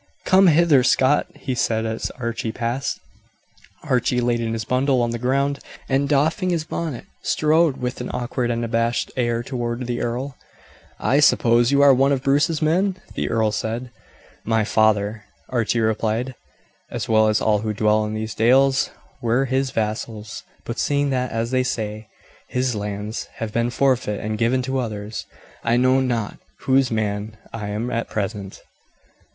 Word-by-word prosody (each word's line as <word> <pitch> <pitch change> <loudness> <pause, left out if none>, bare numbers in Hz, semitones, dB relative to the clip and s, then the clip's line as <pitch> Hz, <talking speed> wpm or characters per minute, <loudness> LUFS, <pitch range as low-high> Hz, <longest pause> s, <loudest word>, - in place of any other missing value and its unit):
"Come 190 +1 +6
hither, 160 -4 +5
Scot," 130 +3 +3
he 130 - -4
said 115 -2 0
as 110 0 -3
Archie 115 -2 -3
passed. 120 +4 -2 0.8
Archie 125 0 +1
laid 120 -1 +1
his 115 -1 -2
bundle 130 +1 +2
on 120 -1 +1
the 120 - -3
ground, 140 +3 0 0.3
and 135 +1 +1
doffing 155 +6 +2
his 170 -3 0
bonnet 160 -5 -4 0.2
strode 160 -4 +2
with 125 0 -4
an 125 - -4
awkward 120 0 -2
and 120 0 -1
abashed 115 +1 0
air 120 -2 0
toward 120 -1 -3
the 120 0 -2
earl. 125 +3 -3 0.6
"I 140 - +2
suppose 120 -4 +4
you 140 0 +4
are 140 -1 +8
one 135 +2 +3
of 135 -2 0
Bruce's 150 +3 +2
men?" 185 +5 +2 0.2
the - - -2
earl 110 -2 +1
said. 115 +3 -3 0.5
"My 110 -1 +1
father," 105 0 +1 0.2
Archie 120 -1 0
replied, 110 +3 0 0.6
"as - - -4
well 110 -1 +4
as 110 0 +2
all 105 -1 +2
who 110 +1 -2
dwell 105 +1 +2
in 105 0 -3
these 110 0 -4
dales, 135 +4 +3 0.3
were 120 +3 +2
his 135 +1 0
vassals; 110 -1 -3 0.2
but 115 - -4
seeing 145 -1 +1
that, 125 -1 -1
as 115 +1 -2
they 130 0 +2
say, 110 -3 -3 0.4
his 125 0 0
lands 105 +1 -4
have 110 -2 -5
been 115 +1 +1
forfeit 125 -5 +1
and 110 0 -3
given 125 +2 +2
to 130 +1 -1
others, 105 -3 -5 0.4
I 120 +1 +2
know 130 +1 +4
not 120 -5 -2 0.2
whose 135 -1 +3
man 110 0 -2 0.2
I 110 -3 -4
am 110 +4 -3
at 115 0 -2
present." 100 -2 -4
120 Hz, 165 wpm, -22 LUFS, 110-135 Hz, 0.8 s, are